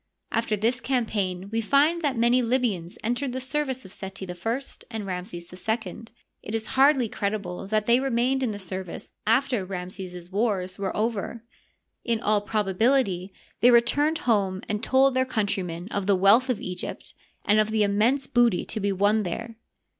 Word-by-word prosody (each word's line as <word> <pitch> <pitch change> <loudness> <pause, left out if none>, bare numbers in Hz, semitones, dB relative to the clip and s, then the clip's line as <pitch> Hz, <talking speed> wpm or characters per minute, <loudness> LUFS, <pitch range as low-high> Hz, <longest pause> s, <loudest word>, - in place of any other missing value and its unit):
After 225 -2 0
this 235 +4 0
campaign 205 -8 -1
we 225 0 0
find 290 +9 +3
that 280 -6 0
many 240 +2 +4
Libyans 230 -8 -1
entered 245 +3 -1
the 260 - -2
service 265 -1 -2
of 190 - -11
Seti 190 0 -7
I 180 - -6 0.5
and 220 -3 -5
Ramses 180 -2 -6
II. 220 +4 -3 0.4
It 215 - -5
is 220 -1 -2
hardly 270 -2 +5
credible 200 -3 -3
that 215 0 +1
they 235 +2 +4
remained 265 0 +1
in 255 - +1
the 210 - -4
service 185 -2 -6 0.2
after 245 -1 +2
Ramses's 180 -1 -7
wars 195 -3 -1
were 195 -1 -2
over. 225 +1 -2 0.6
In 230 -2 0
all 210 -2 +2
probability 205 -1 +1 0.3
they 245 - +6
returned 285 +7 +4
home 195 -5 +1
and 210 0 -2
told 265 +2 +4
their 260 0 +3
coun 230 -5 0
trymen 180 -3 -3
of 200 -1 -2
the 200 - +5
wealth 205 +8 +5
of 250 - 0
Egypt 180 -1 -6 0.3
and 210 +1 +4
of 215 0 +2
the 220 -1 +2
immense 220 +7 +2
booty 240 -6 +2
to 220 - -3
be 200 -1 0
won 205 +3 +2
there. 225 +5 -5
215 Hz, 170 wpm, -26 LUFS, 195-245 Hz, 0.6 s, they